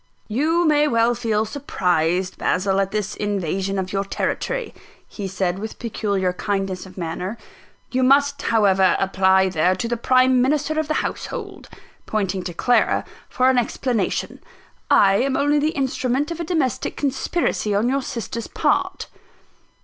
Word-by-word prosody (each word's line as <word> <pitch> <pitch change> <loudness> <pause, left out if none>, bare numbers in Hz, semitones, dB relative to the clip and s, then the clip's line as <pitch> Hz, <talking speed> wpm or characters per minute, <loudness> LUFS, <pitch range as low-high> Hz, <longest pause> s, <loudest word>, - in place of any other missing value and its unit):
"You 315 +10 +1
may 300 -1 +4
well 230 -2 +3
feel 225 -3 0
surprised, 185 - -1
Basil, 190 +1 +1
at 195 -1 +1
this 210 0 -3
invasion 195 -1 -2
of 190 0 -3
your 195 0 0
territory," 485 - -3 0.3
he 200 -3 -6
said, 185 -1 -2
with 220 +1 -6
peculiar 200 -5 -1
kindness 195 -1 -3
of 185 - -15
manner 180 +5 -4 0.5
"you 260 - +1
must, 280 +2 +3
however, 195 -4 +3
apply 190 0 +3
there, 180 +1 +2
to 210 +5 -3
the 240 0 -1
prime 255 +1 +4
minister 300 +3 +1
of 315 - -1
the 310 - 0
household," 405 -6 -6 0.4
pointing 195 -3 -1
to 175 - -4
Clara, 245 +6 +2 0.2
"for 255 +1 +3
an 255 - +3
explanation. 240 -2 -2 0.5
I 195 -1 +5
am 265 +3 +1
only 290 +1 +2
the 300 +2 +1
instrument 265 +2 -1
of 335 - -5
a - - -2
domestic 305 -8 -1
conspiracy 270 - -1
on 210 +4 +2
your 275 +2 +1
sister's 230 -2 -5
part." - - 0
220 Hz, 150 wpm, -22 LUFS, 190-275 Hz, 0.5 s, I